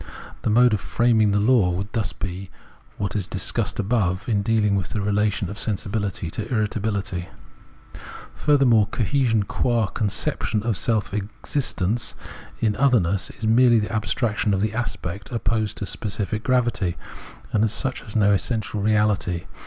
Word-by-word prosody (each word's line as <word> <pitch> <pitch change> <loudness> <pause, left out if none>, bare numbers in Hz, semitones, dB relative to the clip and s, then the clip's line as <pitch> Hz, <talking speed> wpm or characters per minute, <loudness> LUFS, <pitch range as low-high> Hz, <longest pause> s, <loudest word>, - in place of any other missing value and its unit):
The - - -1
mode 120 +2 +5
of 105 - 0
framing 115 -3 +2
the 100 0 +2
law 110 -3 +4
would 95 +3 -3
thus 110 -6 -1
be 95 0 -6 0.5
what 100 -2 -2
we 105 - 0
discussed - - -1
above, 95 -4 0
in 105 -4 +1
dealing 105 -1 +2
with 95 -4 -2
the 105 - -3
relation 105 -1 0
of 100 - -7
sensibihty 100 -4 -2
to 110 +6 -5
irritability. 105 -5 -1 1.0
Furthermore, 125 -8 +3
cohesion, 115 -1 +1
qua 115 +2 0
conception 105 +1 -2
of 115 -2 0
self 110 -1 0
exist 105 +4 -3
ence 110 +6 0 0.5
in 110 -2 +2
otherness, 110 -8 +2
is 110 - -5
merely 120 +1 +5
the 105 0 -1
abstraction 110 -1 0
of 95 - -1
the 110 +1 0
aspect 105 -4 -4
opposed 110 -3 -1
to - - -3
specific 105 +1 -3
gravity, 120 -8 +1 0.5
and 110 - +2
as 110 - +2
such 130 +3 -1
has 105 - -6
no 105 -2 +4
existential 105 0 -1
reahty. 105 -5 +1
105 Hz, 155 wpm, -23 LUFS, 100-115 Hz, 1.0 s, mode